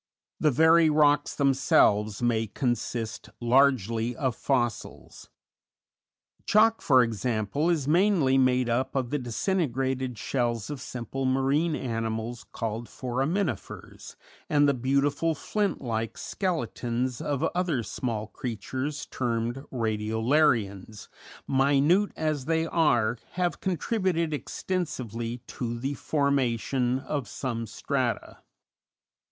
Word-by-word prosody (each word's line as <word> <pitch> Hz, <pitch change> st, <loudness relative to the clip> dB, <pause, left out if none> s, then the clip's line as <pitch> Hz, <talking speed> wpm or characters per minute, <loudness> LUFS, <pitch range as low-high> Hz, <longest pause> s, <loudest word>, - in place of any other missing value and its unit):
The 155 Hz, -, +4 dB
very 160 Hz, +3 st, +5 dB
rocks 145 Hz, -1 st, +3 dB
themselves 110 Hz, -6 st, +3 dB
may 115 Hz, -2 st, +1 dB
consist 120 Hz, -1 st, -3 dB
largely 120 Hz, -2 st, +2 dB
of 130 Hz, -3 st, -1 dB
fossils; 120 Hz, -5 st, -3 dB, 1.1 s
chalk, 225 Hz, +2 st, +4 dB
for 130 Hz, -3 st, +5 dB
example, 115 Hz, -, -1 dB
is 155 Hz, -6 st, 0 dB
mainly 170 Hz, -5 st, +3 dB
made 130 Hz, -1 st, +3 dB
up 120 Hz, +4 st, -1 dB
of 130 Hz, -3 st, -1 dB
the 145 Hz, -, 0 dB
disintegrated 130 Hz, -, -1 dB
shells 120 Hz, 0 st, -1 dB
of 145 Hz, -, -6 dB
simple 130 Hz, +2 st, -4 dB
marine 140 Hz, +5 st, +1 dB
animals 115 Hz, -1 st, -3 dB
called 115 Hz, +1 st, -4 dB
foraminifers, 135 Hz, +6 st, -3 dB, 0.3 s
and 145 Hz, -1 st, +4 dB
the 140 Hz, -, +4 dB
beautiful 140 Hz, +5 st, +1 dB
flint 200 Hz, +3 st, -1 dB
like 115 Hz, -3 st, -3 dB
"skeletons" 125 Hz, -, -2 dB
of 145 Hz, -3 st, -2 dB
other 175 Hz, -9 st, 0 dB
small 110 Hz, -2 st, -3 dB
creatures 130 Hz, +6 st, -4 dB
termed 120 Hz, 0 st, -2 dB
radiolarians, 110 Hz, -2 st, 0 dB, 0.4 s
minute 145 Hz, +9 st, +3 dB
as 155 Hz, -4 st, -1 dB
they 160 Hz, +1 st, +1 dB
are, 120 Hz, -9 st, +2 dB
have 180 Hz, -1 st, -1 dB
contributed 185 Hz, -3 st, 0 dB
extensively 125 Hz, -, -4 dB
to 120 Hz, -1 st, -4 dB
the 135 Hz, +4 st, -2 dB
formation 130 Hz, -3 st, 0 dB
of 135 Hz, -1 st, -4 dB
some 115 Hz, -4 st, -4 dB
strata. -, -, -2 dB
130 Hz, 105 wpm, -27 LUFS, 115-150 Hz, 1.1 s, very